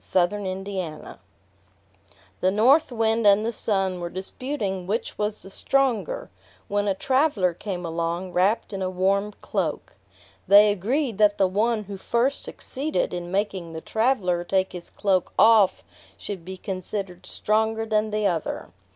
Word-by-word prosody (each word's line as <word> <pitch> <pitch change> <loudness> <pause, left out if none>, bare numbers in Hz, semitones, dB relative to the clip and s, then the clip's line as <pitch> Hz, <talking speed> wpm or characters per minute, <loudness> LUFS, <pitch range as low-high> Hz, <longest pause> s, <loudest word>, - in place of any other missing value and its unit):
Orthographic 190 +1 +1 0.3
version - - -11 1.2
The 185 - +3
North 255 +10 +4
Wind 225 -1 +2
and 205 +2 +5
the 230 - 0
Sun 195 -4 -1
were 175 0 -4
disputing 190 0 -4
which 215 +4 -2
was 210 0 -3
the 195 - -11
stronger, 275 - 0 0.4
when 205 0 0
a 195 - +1
traveler 260 - +2
came 180 0 -5
along 170 +2 -2
wrapped 200 +4 +1
in 195 - -4
a 185 - 0
warm 195 +3 +1
cloak. - - -3 0.5
They 205 +1 +8
agreed 225 - -1
that 205 -1 +4
the 195 - +4
one 215 +4 +1
who 200 0 -7
first 240 +8 0
succeeded 290 -3 -3
in 175 -1 -4
making 190 -4 -2
the 160 - -5
traveler 210 -7 +1
take 190 +1 0
his 175 -1 -8
cloak 190 -3 0
off 220 -4 +5 0.3
should 195 -5 -6
be 190 +2 -7
considered 185 -1 -5
stronger 220 +1 0
than 215 -1 +1
the 215 0 -1
other. 170 -5 -2
200 Hz, 150 wpm, -24 LUFS, 185-220 Hz, 1.2 s, They